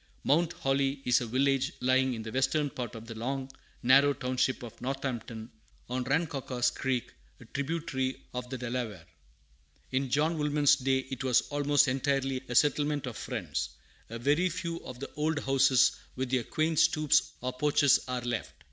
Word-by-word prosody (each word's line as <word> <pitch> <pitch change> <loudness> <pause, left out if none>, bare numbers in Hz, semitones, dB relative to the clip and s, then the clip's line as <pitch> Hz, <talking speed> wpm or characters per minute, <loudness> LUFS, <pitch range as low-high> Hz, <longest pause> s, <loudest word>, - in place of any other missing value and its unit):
[Mount 165 +4 +2
Holly 135 0 0
is 125 -1 +4
a 120 - -3
village 135 +4 +1
lying 130 0 +2
in 110 - -6
the 110 - -6
western 135 +3 +1
part 120 -2 -5
of 115 0 -8
the 115 - -7
long, 130 +4 -4 0.3
narrow 140 +3 +6
township 130 -1 -1
of 115 -1 -10
Northampton, 125 -4 -4 0.4
on 125 +1 -1
Rancocas 135 -4 0
Creek, 130 -2 -2 0.3
a - - -13
tributary 140 -3 -2
of 125 0 -5
the 130 - -4
Delaware. 115 -7 -4 0.9
In 130 0 0
John 155 +5 +1
Woolman's 150 -1 +4
day 130 0 0
it 130 - -4
was 130 -2 +4
almost 145 0 +3
entirely 135 0 0
a 125 - -3
settlement 145 +1 +2
of 125 -3 -5
Friends. - - -3 0.4
A 115 - -5
very 145 +9 +2
few 170 0 -4
of 125 -1 -9
the 140 - -7
old 155 +1 0
houses 135 -2 +4 0.2
with 130 -1 -3
their 125 -3 +1
quaint 155 0 0
stoops 155 -1 +3
or 125 +1 -2
porches 145 +1 +4
are 125 -1 -2
left. 120 -2 -3
135 Hz, 165 wpm, -30 LUFS, 125-145 Hz, 0.9 s, narrow